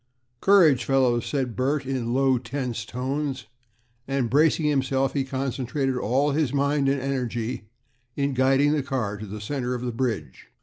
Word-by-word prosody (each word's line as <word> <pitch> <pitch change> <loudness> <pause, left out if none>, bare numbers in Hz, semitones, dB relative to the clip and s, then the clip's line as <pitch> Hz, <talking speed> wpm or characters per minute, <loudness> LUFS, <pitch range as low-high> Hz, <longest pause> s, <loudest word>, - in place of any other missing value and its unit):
"Courage, 165 -10 +5
fellows," 125 -3 +2
said 130 -5 -2
Bert, 140 +2 0
in 130 -3 -2
low, 130 0 +3
tense 120 -2 -4
tones, 135 +2 -3 0.6
and 135 -4 -1
bracing 155 +2 +3
himself, 135 -2 +1
he 140 - 0
concentrated 135 0 -2
all 130 +5 +1
his 145 -3 0
mind 140 0 +1
and 140 0 +1
energy 125 -4 -3 0.5
in 140 -1 0
guiding 135 +3 +3
the 150 -1 +1
car 125 -7 -2
to 105 +1 -8
the 105 +2 -7
center 125 +3 -3
of 125 - -5
the 125 - -2
bridge. 115 - -3
130 Hz, 160 wpm, -25 LUFS, 125-140 Hz, 0.6 s, Courage